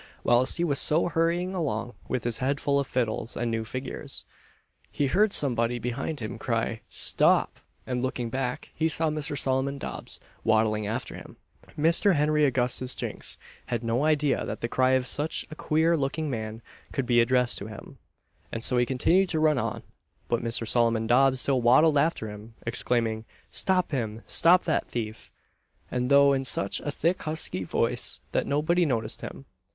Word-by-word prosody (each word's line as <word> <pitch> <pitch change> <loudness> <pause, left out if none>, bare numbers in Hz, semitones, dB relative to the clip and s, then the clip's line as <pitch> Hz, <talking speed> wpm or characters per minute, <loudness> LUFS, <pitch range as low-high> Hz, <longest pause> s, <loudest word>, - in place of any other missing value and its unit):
Whilst 120 +2 +3
he 170 - 0
was 145 -5 +2
so 160 +3 +4
hurrying 170 +3 0
along, 125 - -2
with 125 -3 -2
his 120 -2 -1
head 140 +2 0
full 140 0 +1
of 140 - -2
fiddles 115 -2 -2
and 120 -1 -1
new 115 0 -1
figures, 130 +3 -6 0.6
he 145 - -1
heard 200 +9 +3
somebody 120 -6 +1
behind 125 +5 -4
him 110 +1 -5
cry 115 -2 -2
"Stop!" - - +2 0.3
and 125 -1 -2
looking 125 -2 -3
back, 130 -1 -3
he 160 0 0
saw 160 0 +2
Mr. 150 -1 -1
Solomon 135 +1 0
Dobbs - - -6 0.2
waddling 110 -1 +2
after 115 +5 -4
him. - - -11 0.4
Mr. 170 +5 +4
Henry 150 0 +3
Augustus 130 -1 +1
Jinks - - -4 0.3
had 120 -2 -2
no 115 +4 0
idea 150 -2 +2
that - - -5
the 115 - -1
cry 130 +2 +2
of 130 -1 +2
such 145 +4 -1
a - - -7
queer 160 +2 +2
looking 150 +1 -2
man 110 -1 -5 0.3
could 135 - -2
be 120 -1 +4
addressed 125 +1 +2
to 100 - -7
him, 110 -2 -11 0.5
and 115 - -4
so 125 - +2
he 120 - +2
continued 175 +9 +2
to 160 - 0
run 155 -3 +3
on; - - -3 0.4
but 120 - 0
Mr. 115 -1 -1
Solomon 115 -1 +2
Dobbs 130 +2 +3
still 135 -3 +1
waddled 145 +5 +5
after 155 -7 0
him, 105 +2 -10
exclaiming 115 -1 +1 0.3
"Stop 185 -2 +2
him! 115 -5 -3
stop 180 +2 +4
that 155 - 0
thief!" 110 -2 -5 0.6
&c. - - 0
though 140 0 +6
in 135 -1 0
such 100 -6 0
a 145 - -5
thick 170 +5 0
husky 155 -11 -2
voice - - -1
that - - 0
nobody 155 +5 +2
noticed 115 -7 -2
him. 135 - -8
130 Hz, 175 wpm, -27 LUFS, 115-150 Hz, 0.6 s, though